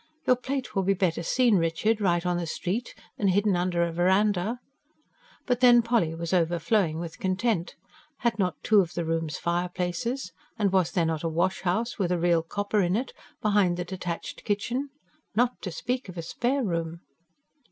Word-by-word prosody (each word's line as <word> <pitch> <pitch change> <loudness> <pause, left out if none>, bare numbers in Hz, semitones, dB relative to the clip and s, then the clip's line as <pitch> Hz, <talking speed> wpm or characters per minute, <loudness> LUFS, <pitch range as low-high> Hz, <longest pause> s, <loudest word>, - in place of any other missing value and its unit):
"Your 255 - +5
plate 260 +1 -4
will 195 - +1
be 195 +1 +2
better 175 -4 0
seen, 235 +4 +3
Richard, 175 +7 +1
right 175 -3 +2
on 180 -1 +1
the 170 -1 -3
street, 200 +9 -3 0.2
than 200 - +2
hidden 200 +1 +3
under 175 -1 +1
a 170 - -1
verandah." 190 +5 +2 0.9
But 245 -2 +1
then 240 -2 +7
Polly 225 -9 +1
was 170 +1 -4
overflowing 175 0 +2
with 165 -1 -6
content. 190 -1 0 0.5
Had 235 -2 0
not 185 -2 +1
two 215 -2 +5
of 175 -4 0
the 170 - -1
rooms 165 -2 -1
fireplaces? 180 +7 -2 0.3
And 205 -4 +1
was 180 -3 +3
there 170 -3 +2
not 160 -2 -1
a 165 - -1
wash 170 +4 0
house, 220 +7 -1
with 180 -3 0
a 180 - +2
real 170 -1 +3
copper 205 +5 -1
in 180 0 +1
it, 245 +4 -2 0.3
behind 200 -4 +3
the 180 - -3
detached 180 -2 -5
kitchen? 240 +7 -1 0.5
Not 245 +2 +1
to 185 - -4
speak 245 +7 -3
of 180 - -9
a 170 - -4
spare 255 +10 -1
room! 170 -3 -2
185 Hz, 185 wpm, -27 LUFS, 170-220 Hz, 0.9 s, then